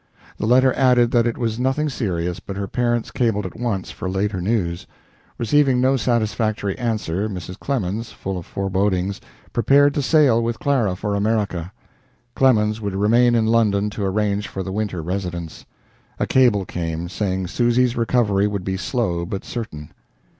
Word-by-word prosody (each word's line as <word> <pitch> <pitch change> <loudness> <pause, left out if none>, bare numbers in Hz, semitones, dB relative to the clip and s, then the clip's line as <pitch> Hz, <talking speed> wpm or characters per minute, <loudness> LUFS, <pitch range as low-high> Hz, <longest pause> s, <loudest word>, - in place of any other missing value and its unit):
The 105 - -1
letter 130 +2 +5
added 125 -3 +3
that 120 -1 +3
it 115 - -2
was 115 -1 -2
nothing 135 +4 +1
serious, 90 - -2
but 95 +2 -7
her 100 - -2
parents 120 +2 -1
cabled 110 -5 0
at 95 - -7
once 110 -6 -3
for 95 - -5
later 95 0 -1
news. 90 -4 -1 0.5
Receiving 135 +1 +3
no 130 +2 +3
satisfactory 110 -4 0
answer, 110 -4 -1
Mrs. 90 -1 -7
Clemens, 115 -4 -2
full 95 0 -5
of 85 - -11
forebodings, 95 0 -1 0.3
prepared 140 +4 +4
to 145 - 0
sail 135 -5 +4
with 115 0 -2
Clara 120 -10 +1
for 105 +2 -3
America. 100 -4 -1 0.6
Clemens 110 -4 +2
would 100 -2 -3
remain 120 +4 +4
in 115 -1 +2
London 105 -2 +2
to 105 - -4
arrange 105 +1 0
for 95 - -5
the 95 - -5
winter 100 -4 -3
residence. 90 -2 -5 0.5
A - - 0
cable 120 -7 +3
came, 85 -1 -4
saying 95 0 -2
Susy's 120 +5 +1
recovery 110 -4 +2
would 100 -2 -3
be 95 0 -2
slow 95 -6 -1
but 95 +3 -5
certain. 75 -11 -6
105 Hz, 160 wpm, -21 LUFS, 95-120 Hz, 0.6 s, letter